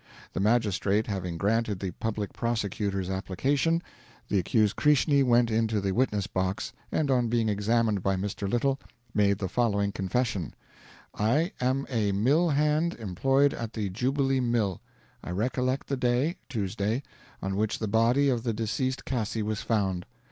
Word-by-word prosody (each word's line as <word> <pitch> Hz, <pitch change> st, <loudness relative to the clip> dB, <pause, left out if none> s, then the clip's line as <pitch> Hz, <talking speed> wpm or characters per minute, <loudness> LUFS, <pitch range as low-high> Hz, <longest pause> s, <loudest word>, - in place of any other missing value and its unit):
"The -, -, -2 dB
Magistrate 105 Hz, -1 st, +2 dB
having 90 Hz, -4 st, -3 dB
granted 105 Hz, +1 st, 0 dB
the 95 Hz, -2 st, -3 dB
Public 105 Hz, +1 st, -3 dB
Prosecutor's 100 Hz, -4 st, -1 dB
application, 135 Hz, -, 0 dB, 0.5 s
the 100 Hz, -, +2 dB
accused 105 Hz, +3 st, +2 dB
Krishni 150 Hz, -1 st, +4 dB
went 120 Hz, -2 st, +3 dB
into 110 Hz, -1 st, +1 dB
the 100 Hz, -1 st, -1 dB
witness 105 Hz, -2 st, +1 dB
box, 95 Hz, 0 st, -2 dB, 0.2 s
and, 145 Hz, -3 st, +1 dB
on 125 Hz, -2 st, +2 dB
being 115 Hz, -1 st, +1 dB
examined 105 Hz, 0 st, +1 dB
by 95 Hz, +1 st, +1 dB
Mr. 100 Hz, +1 st, -3 dB
Little, 135 Hz, +5 st, +1 dB, 0.3 s
made 100 Hz, -1 st, +3 dB
the 95 Hz, -, -2 dB
following 100 Hz, -1 st, +1 dB
confession: 100 Hz, -, -2 dB, 0.6 s
I 145 Hz, -, +1 dB
am 130 Hz, +2 st, +1 dB
a 110 Hz, -6 st, 0 dB
mill 140 Hz, -, +3 dB
hand 150 Hz, +3 st, +2 dB
employed 135 Hz, +8 st, +2 dB
at 115 Hz, -1 st, -5 dB
the 105 Hz, -3 st, -2 dB
Jubilee 135 Hz, +5 st, +1 dB
Mill. 120 Hz, -7 st, 0 dB, 0.4 s
I -, -, -7 dB
recollect 125 Hz, +7 st, -1 dB
the 140 Hz, -, -2 dB
day 125 Hz, +7 st, +1 dB
(Tuesday); 110 Hz, +2 st, -1 dB, 0.4 s
on 95 Hz, 0 st, -3 dB
which 105 Hz, +1 st, 0 dB
the 110 Hz, -, -3 dB
body 115 Hz, +6 st, +3 dB
of 125 Hz, -4 st, +1 dB
the 115 Hz, -1 st, -1 dB
deceased 120 Hz, +5 st, -2 dB
Cassi 110 Hz, -3 st, -2 dB
was 110 Hz, 0 st, -2 dB
found. 95 Hz, -5 st, -1 dB
110 Hz, 155 wpm, -28 LUFS, 100-130 Hz, 0.6 s, Krishni